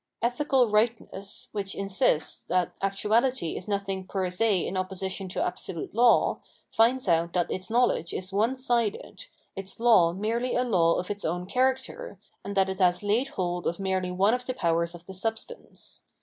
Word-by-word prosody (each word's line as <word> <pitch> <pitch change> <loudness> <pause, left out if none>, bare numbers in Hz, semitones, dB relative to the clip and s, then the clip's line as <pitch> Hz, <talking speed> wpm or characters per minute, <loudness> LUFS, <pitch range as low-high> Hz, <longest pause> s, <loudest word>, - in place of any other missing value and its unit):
Ethical 250 +1 +2
rightness, 210 -2 -1
which 195 -2 -4
insists 195 - 0
that 180 -2 +1
actuahty 210 +2 +1
is 180 - -7
nothing 195 -2 -2
per 185 -2 -2
se 200 0 +1
in - - -4
opposi 190 0 -3
tion 195 0 -5
to - - -1
absolute 175 -4 -5
law, 235 +2 +4 0.3
finds 240 +2 +2
out 170 -1 +2
that 175 -2 0
its 185 0 -4
knowledge 230 -7 +1
is 185 +1 -5
onesided, 235 - -1 0.3
its 195 +1 -6
law 220 -8 +5
merely 225 +7 -1
a 250 - +2
law 175 -9 +3
of 180 - -3
its 205 0 -5
own 175 +2 -2
character, 265 - -1 0.3
and 200 0 -5
that 190 0 +4
it 190 0 -4
has 180 0 +3
laid 220 +6 +1
hold 180 -9 -3
of 170 - -2
merely 190 -1 -1
one 190 +4 +2
of 250 0 -2
the 255 - -2
powers 170 -4 0
of 170 0 -13
the 190 - -9
substance. 225 - -6
195 Hz, 175 wpm, -27 LUFS, 185-235 Hz, 0.3 s, law